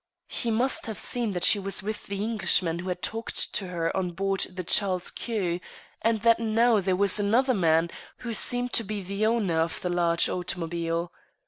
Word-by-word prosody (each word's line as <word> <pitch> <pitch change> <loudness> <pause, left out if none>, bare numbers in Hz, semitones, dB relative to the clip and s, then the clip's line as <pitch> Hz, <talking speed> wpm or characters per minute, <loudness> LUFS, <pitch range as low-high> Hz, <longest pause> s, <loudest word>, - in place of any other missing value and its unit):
He 235 - 0
must 240 +4 +1
have 220 -3 -5
seen 235 -1 0
that 180 -1 -3
she 205 - +7
was 195 0 -2
with 215 +1 -5
the 200 0 -4
Englishman 190 -6 0
who 185 +2 -5
had 180 0 -4
talked 225 +1 -3
to 195 - -2
her 170 -2 -2
on 180 -2 -2
board 195 +2 -2
the 185 0 -7
Charles 185 0 +2
Quex, 185 -7 -3 0.4
and 225 -1 +1
that 230 0 +4
now 225 0 +2
there 190 -1 0
was 200 +2 +3
another 240 +6 +2
man, 165 -4 +2 0.3
who 235 - -3
seemed 245 +2 +2
to 230 - +4
be 210 -1 -5
the 200 +3 -1
owner 205 -8 0
of 165 0 -2
the 180 - -2
large 170 -1 +2
automobile. 170 -1 -3
195 Hz, 195 wpm, -26 LUFS, 175-225 Hz, 0.4 s, she